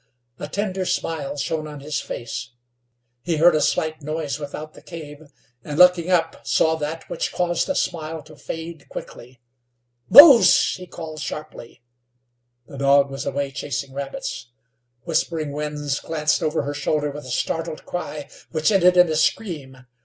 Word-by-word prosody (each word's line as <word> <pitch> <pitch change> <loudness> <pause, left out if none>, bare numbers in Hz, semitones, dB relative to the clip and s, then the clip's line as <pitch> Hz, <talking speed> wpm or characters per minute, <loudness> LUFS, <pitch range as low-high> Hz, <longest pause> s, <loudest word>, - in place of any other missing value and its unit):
A - - -5
tender 190 +2 -2
smile 160 -5 -2
shone 155 +1 -2
on 150 -2 -9
his 150 +1 -3
face. 115 0 -6 0.7
He 170 +1 -1
heard 170 +2 +6
a 155 - +2
slight 155 0 0
noise 155 0 -3
without 150 +1 -7
the - - -15
cave, 155 -3 -10 0.4
and, 150 -1 -5
looking 180 -1 +6
up, 165 -3 +1
saw 160 0 +3
that 155 +1 -5
which - - -3
caused 175 -1 0
the 280 - -1
smile 160 -2 -2
to 155 0 -15
fade 160 0 -8
quickly. 125 +1 -10 0.7
"Mose!" 275 - +9
he 185 -1 -9
called, 160 -3 -8
sharply. 135 -5 -8 0.8
The 140 - -10
dog 140 0 +4
was 135 0 -5
away 140 0 -2
chasing 140 -1 -4
rabbits. 135 -3 -5 0.6
Whispering 155 -1 -1
Winds 150 -1 -3
glanced 155 0 0
over 155 -3 0
her 145 +1 -3
shoulder 145 0 -1
with 145 0 -9
a - - -9
startled 160 +5 -3
cry, 155 -4 -5 0.2
which 155 +5 +1
ended 180 -2 +4
in 180 0 +7
a 160 - -1
scream. 145 - -2
155 Hz, 155 wpm, -22 LUFS, 145-165 Hz, 0.8 s, Mose